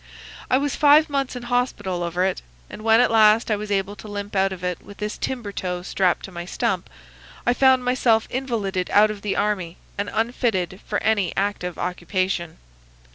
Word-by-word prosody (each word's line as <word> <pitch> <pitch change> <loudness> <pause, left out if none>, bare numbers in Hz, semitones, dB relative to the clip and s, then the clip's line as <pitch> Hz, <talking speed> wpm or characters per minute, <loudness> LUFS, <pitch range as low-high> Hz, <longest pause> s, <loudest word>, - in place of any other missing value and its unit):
I 255 - +4
was 285 0 -1
five 300 +1 +5
months 275 -2 -1
in 245 - -6
hospital 240 -7 -1
over 175 +1 0
it, 190 - -1 0.3
and - - -8
when 225 +1 +5
at - - +3
last 220 0 +5
I - - +3
was 210 0 -6
able 200 0 -1
to 195 - -10
limp 205 0 -6
out 195 0 +2
of 185 -1 -7
it 180 -1 -2
with 200 - -13
this 210 0 -3
timber 240 -6 -4
toe 180 -2 -4
strapped 185 -1 0
to 190 - -11
my 175 -1 -6
stump 175 - -2 0.6
I 245 - +4
found 260 -1 +4
myself 245 -3 +2
invalided 215 -8 -2
out 215 +1 +6
of 205 -1 -8
the 205 -1 -2
army 195 -5 -1 0.2
and 205 - -1
unfitted 220 -5 -1
for 205 - 0
any 205 -5 +1
active 195 -3 -2
occupation. 180 -1 -2
205 Hz, 190 wpm, -23 LUFS, 185-240 Hz, 0.6 s, out